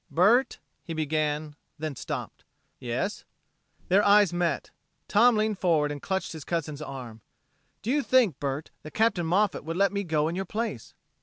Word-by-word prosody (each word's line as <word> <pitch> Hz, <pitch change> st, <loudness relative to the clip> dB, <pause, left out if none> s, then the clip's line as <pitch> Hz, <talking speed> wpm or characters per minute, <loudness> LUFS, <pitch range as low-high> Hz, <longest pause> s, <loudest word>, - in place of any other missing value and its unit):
"Bert...." 220 Hz, +10 st, +3 dB, 0.3 s
he 165 Hz, -, -6 dB
began, 155 Hz, -1 st, -1 dB, 0.2 s
then 155 Hz, -2 st, -4 dB
stopped. -, -, -6 dB, 0.4 s
"Yes?" 130 Hz, -, -3 dB, 0.6 s
Their 195 Hz, +3 st, +4 dB
eyes 205 Hz, -3 st, +5 dB
met. 175 Hz, -1 st, -1 dB, 0.4 s
Tom 235 Hz, +3 st, +5 dB
leaned 215 Hz, -2 st, 0 dB
forward 155 Hz, -5 st, +2 dB
and 145 Hz, -1 st, -6 dB
clutched 190 Hz, -1 st, -2 dB
his 160 Hz, -3 st, -7 dB
cousin's 155 Hz, -3 st, -3 dB
arm. 125 Hz, -6 st, -8 dB, 0.6 s
"Do 225 Hz, -, -1 dB
you 295 Hz, +2 st, +2 dB
think, 245 Hz, -, +3 dB
Bert, 140 Hz, +2 st, -3 dB
that 155 Hz, -, -11 dB
Captain 215 Hz, -7 st, +2 dB
Moffat 195 Hz, +2 st, +1 dB
would 165 Hz, +3 st, -4 dB
let 200 Hz, +1 st, +3 dB
me 200 Hz, 0 st, -1 dB
go 155 Hz, -3 st, +1 dB
in 165 Hz, -, -2 dB
your 190 Hz, +1 st, -2 dB
place?" 215 Hz, -, -4 dB
170 Hz, 165 wpm, -27 LUFS, 150-205 Hz, 0.6 s, eyes